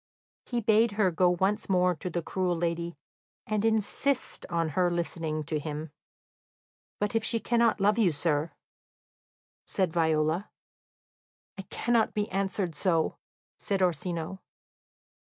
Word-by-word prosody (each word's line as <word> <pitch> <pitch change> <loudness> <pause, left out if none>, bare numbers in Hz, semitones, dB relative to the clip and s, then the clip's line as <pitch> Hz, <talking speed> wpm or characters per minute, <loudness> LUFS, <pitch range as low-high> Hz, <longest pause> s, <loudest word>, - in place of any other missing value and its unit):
He 240 -1 -1
bade 220 +1 +4
her 200 -3 +2
go 180 +2 +3
once 190 +5 0
more 180 -1 +3
to 180 - -4
the 175 0 -3
cruel 180 -1 -1
lady, 170 -1 -2 0.5
and 215 -1 -1
insist 225 +5 0
on 165 -2 0
her 180 +4 +2
listening 165 -2 -2
to 150 +1 -2
him. 150 0 -5 1.1
"But 210 +2 -1
if 225 -1 +1
she 230 - +2
cannot 235 0 +2
love 205 +3 +3
you, 195 -6 +4
sir?" 150 0 0 1.1
said 185 -4 -1
Viola. 160 +2 +1 1.1
"I 195 - -5
cannot 235 -1 +1
be 210 0 0
answered 195 -2 -1
so," 165 0 0 0.4
said 195 -2 0
Orsino. 175 +1 -1
180 Hz, 130 wpm, -29 LUFS, 165-210 Hz, 1.1 s, bade